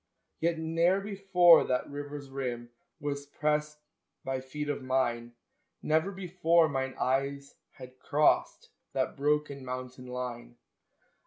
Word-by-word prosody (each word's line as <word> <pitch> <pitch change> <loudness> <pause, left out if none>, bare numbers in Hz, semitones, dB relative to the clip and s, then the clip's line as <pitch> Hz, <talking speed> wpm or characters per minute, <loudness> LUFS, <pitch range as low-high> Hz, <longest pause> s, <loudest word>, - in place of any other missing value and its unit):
Yet 165 0 +1
ne'er 165 +4 +2
before 190 -4 +5
that 125 0 -1
river's 145 -1 -7
rim 120 -3 -4 0.3
Was 145 0 -4
pressed 150 +1 -1 0.5
by 130 -1 -2
feet 150 +3 -5
of 145 -1 -2
mine, 120 -2 -1 0.5
Never 160 +5 +2
before 170 -3 +2
mine 135 -2 -2
eyes 140 +2 -1 0.2
had 130 0 -12
crossed 150 +1 +1 0.2
That - - -1
broken 145 -1 0
mountain 125 0 -6
line. 125 - -6
140 Hz, 115 wpm, -30 LUFS, 130-160 Hz, 0.5 s, before